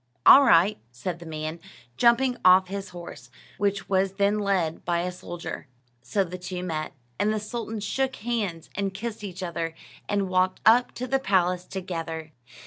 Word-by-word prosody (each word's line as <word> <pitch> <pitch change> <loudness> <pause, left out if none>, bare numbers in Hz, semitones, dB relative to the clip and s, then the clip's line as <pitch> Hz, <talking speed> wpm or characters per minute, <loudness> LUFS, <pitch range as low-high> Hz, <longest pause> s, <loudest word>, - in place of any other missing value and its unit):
"All 280 - +10
right," 185 -3 +5
said 165 +8 -5
the 170 - -10
man, 155 +1 -5 0.4
jumping 245 - +4
off 185 0 +6
his 195 0 -5
horse, 170 -8 -10 0.3
which 200 0 0
was 190 0 +1
then 200 +1 +2
led 190 -6 0
by 170 0 0
a 180 +1 -2
soldier. 175 -3 -7 0.3
So 195 +9 0
the 180 0 -7
two 180 0 -5
met, 155 -3 -3 0.3
and 210 - +2
the 215 - 0
sultans 220 0 -5
shook 265 +5 -1
hands, 205 -8 -3
and 195 -1 -2
kissed 220 +1 -5
each 190 -2 -6
other, 165 -2 -3 0.3
and 200 -1 +1
walked 185 0 +1
up 240 +3 +5
to 255 - -4
the 270 +1 +1
palace 180 -5 +1
together. 165 -4 -5
185 Hz, 170 wpm, -26 LUFS, 170-210 Hz, 0.4 s, All